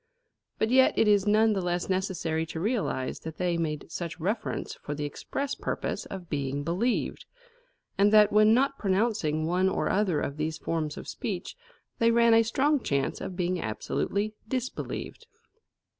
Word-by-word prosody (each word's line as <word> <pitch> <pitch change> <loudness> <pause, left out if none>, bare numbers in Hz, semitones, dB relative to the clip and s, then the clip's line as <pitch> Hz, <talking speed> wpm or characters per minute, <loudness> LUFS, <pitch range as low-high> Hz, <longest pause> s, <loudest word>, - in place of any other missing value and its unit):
But 220 - 0
yet 260 0 +5
is 205 -3 +4
it - - +2
none 215 +1 +4
the 195 - -1
less 175 0 -1
necessary 185 -4 -1
to 160 - -5
realise 200 - -1
that 160 -1 -8
they 180 -1 0
made 160 -1 -3
such 170 0 -5
reference 210 +6 -2
for 150 - -4
the 145 0 -3
express 275 - -4
purpose - - -3
of 185 -3 -7
being 140 -2 -2
believed, 190 +10 -1 0.7
and 205 +1 +5
that 210 -1 +6
when 215 +1 +6
not 275 +4 +2
pronouncing 190 -7 +1
one 180 +3 +2
or - - -1
other 190 -6 +1
of 140 - -3
these 155 +1 -2
forms 155 -2 -3
of - - -8
speech, 195 -5 -4 0.4
they 230 - +4
ran 235 0 +5
a 225 - +7
strong 275 +5 +1
chance 140 -7 -1
of 185 - -5
being 180 0 -1
absolutely 200 - -2
disbelieved. 255 +1 -4
190 Hz, 165 wpm, -28 LUFS, 160-220 Hz, 0.7 s, a